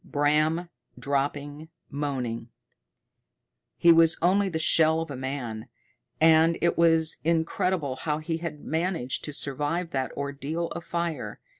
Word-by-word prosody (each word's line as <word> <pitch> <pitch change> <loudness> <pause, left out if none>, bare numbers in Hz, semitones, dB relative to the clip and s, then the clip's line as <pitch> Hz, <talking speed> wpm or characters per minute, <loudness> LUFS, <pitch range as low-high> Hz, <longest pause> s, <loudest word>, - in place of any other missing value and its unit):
Bram 155 +4 +1 0.3
dropping, 145 +2 -3 0.2
moaning; 125 -5 -3 1.3
he 170 - +6
was 165 0 +5
only 195 +3 +2
the 165 - -3
shell 160 0 +4
of 165 -2 -6
a - - -5
man, 125 -4 -5 0.5
and 160 +1 +5
it 170 - +1
was 165 -1 +3
incredible 165 -3 0
how 150 +2 -2
he 160 +1 -3
had 160 -3 -6
managed 160 -5 -2
to 150 - -5
survive 150 +4 -2
that 130 -3 -2
ordeal 140 +4 -4
of 170 - -7
fire. 170 -5 -3
160 Hz, 130 wpm, -26 LUFS, 140-165 Hz, 1.3 s, he